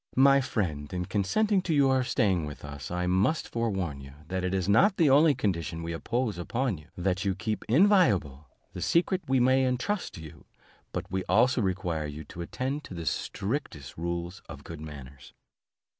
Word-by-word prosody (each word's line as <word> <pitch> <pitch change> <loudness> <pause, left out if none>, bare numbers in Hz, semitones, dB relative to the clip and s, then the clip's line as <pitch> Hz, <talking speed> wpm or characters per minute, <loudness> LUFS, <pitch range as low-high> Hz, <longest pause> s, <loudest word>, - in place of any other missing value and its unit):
My 135 +1 +6
friend, 80 - -2
in 90 0 -2
consenting 190 - +1
to 170 -4 -1
your 135 -2 +4
staying 95 -9 +1
with 75 0 -9
us, 70 -3 -7
I 90 0 -2
must 95 - +1
forewarn 95 -11 -2
you, 70 0 -11 0.2
that 95 0 -2
it 90 - 0
is 95 -1 -1
not 185 - +4
the 155 -5 +4
only 145 +1 +6
condition 85 -6 -2
we 85 0 -3
impose 115 +2 -2
upon 115 - -1
you 75 - -17
that 95 +1 0
you 95 -2 0
keep 110 +1 -3
inviolable 110 - +3 0.3
the - - -6
secret 180 +2 +2
we 135 -1 +3
may 130 +2 +4
entrust 130 +11 -1
to 80 - -9
you, 80 - -12 0.5
but - - -5
we 95 0 -1
also 120 +6 +3
require 90 -5 -1
you 75 +2 -7
to 85 +3 -9
attend 130 - -3
to 95 - -9
the 85 -1 -5
strictest 95 - -3
rules 85 +2 -4
of - - -9
good 80 -2 -8
manners." 70 -4 -10
95 Hz, 185 wpm, -28 LUFS, 85-130 Hz, 0.5 s, My